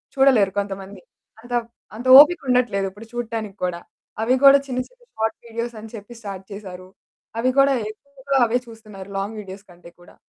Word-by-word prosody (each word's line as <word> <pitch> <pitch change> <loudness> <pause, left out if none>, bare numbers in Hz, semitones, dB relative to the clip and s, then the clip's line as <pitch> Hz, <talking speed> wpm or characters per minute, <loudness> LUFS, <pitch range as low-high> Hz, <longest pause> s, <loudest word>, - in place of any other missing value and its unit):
చూడలేరు 260 -8 +4
కొంతమంది. 195 -1 -6 0.4
అంత 240 +1 -15
వ్ - - -21 0.3
అంత 240 +4 -6
ఓపిక 325 +4 +6
ఉండట్లేదు 245 -6 +1
ఇప్పుడు 205 +4 -13
చూడటానికి 225 -4 -4
కూడా. 180 -1 -2 0.4
అవి 245 +3 +2
కూడా 275 0 +9
చిన్న, 255 -2 -3
చిన్న - - -27
షార్ట్ 220 0 -1
వీడియోస్ 235 +1 -4
అని 220 +1 -10
చెప్పి 210 +2 -10
స్టార్ట్ 195 -2 -7
చేసారు. 185 -3 -9 0.5
అవి 250 +3 +1
కూడా 275 0 +5 0.2
ఎక్కువగా 275 +4 -4
అవే 235 +1 +1
చూస్తున్నారు. 215 -4 -12
లాంగ్ 205 +3 -4
వీడియోస్ 195 -1 -10
కంటే 175 -1 -15
కూడా. 175 - -18
220 Hz, 170 wpm, -22 LUFS, 195-250 Hz, 0.5 s, కూడా